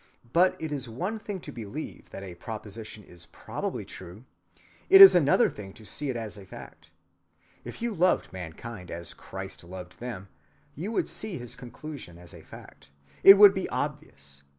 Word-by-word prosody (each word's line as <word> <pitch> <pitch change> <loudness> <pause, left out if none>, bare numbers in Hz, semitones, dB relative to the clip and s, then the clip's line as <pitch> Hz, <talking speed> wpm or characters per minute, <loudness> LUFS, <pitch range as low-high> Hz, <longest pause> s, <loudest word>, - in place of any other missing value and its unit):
But 180 +2 +4
it 160 -1 -5
is 135 -4 -4
one 185 - -4
thing 205 -2 -6
to 145 - -9
believe 120 +5 -8
that 95 - -9
a 95 -2 -8
proposition 110 +2 -8
is 90 -1 -11
probably - - -5
true; 90 +7 -11 0.7
it 195 - +9
is 195 -1 +13
another 150 -6 +4
thing 95 -2 -9
to 110 - -15
see 145 +6 -3
it 130 - -2
as 110 -2 -6
a 100 - -12
fact. 80 +1 -12 0.7
If - - -8
you 235 -1 -1
loved 180 - +1
mankind 90 +3 -8
as 85 +1 -6
Christ - - -9
loved 90 0 -10
them, 105 -6 -7 0.4
you 180 +9 -5
would 230 - 0
see 215 -4 -3
his 120 0 -7
conclusion 125 - -9
as 85 -1 -14
a - - -12
fact. 70 - -14 0.3
It 195 - +12
would 205 -1 +9
be 190 - -3
obvious. 70 0 -5
115 Hz, 175 wpm, -27 LUFS, -, 0.7 s, is